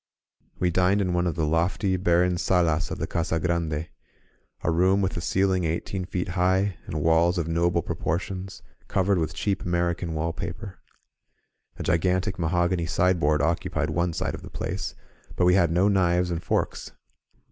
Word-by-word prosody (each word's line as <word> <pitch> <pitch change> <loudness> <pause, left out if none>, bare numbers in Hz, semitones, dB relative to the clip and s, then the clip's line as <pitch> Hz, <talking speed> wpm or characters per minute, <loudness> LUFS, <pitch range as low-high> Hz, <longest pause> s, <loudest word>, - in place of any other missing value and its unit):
We 90 -1 +1
dined 90 +3 +3
in 90 -3 0
one 90 0 +1
of 85 - -1
the 80 - 0
lofty, 95 +5 +1
barren 90 0 +2
solas 85 -2 +1
of - - -4
the - - -2
Casa 80 -1 -1
Grande; 85 -2 -1 0.8
a - - +1
room 95 +4 +3
with 95 -2 0
a 85 - -3
ceiling 95 0 +1
eighteen 85 +3 -2
feet 90 -1 -3
high, 95 +1 +1
and 75 -1 -3
walls 85 +2 +3
of 85 -2 -1
noble 85 0 +1
proportions, 95 +3 -4 0.2
covered 95 -2 +1
with 80 0 -2
cheap 100 -2 -1
American 85 -1 -1
wallpaper. 85 +5 -4 1.0
A - - -5
gigantic 90 +3 0
mahogany 85 0 +1
sideboard 85 -5 +2
occupied 80 +2 -1
one 85 0 0
side - - -2
of - - -7
the - - -10
place, - - -4 0.4
but 90 - +2
we 90 - +5
had 90 -3 +4
no 90 +4 +3
knives 90 -3 +2
and 85 0 -2
forks. - - -2
90 Hz, 165 wpm, -25 LUFS, 85-95 Hz, 1.0 s, we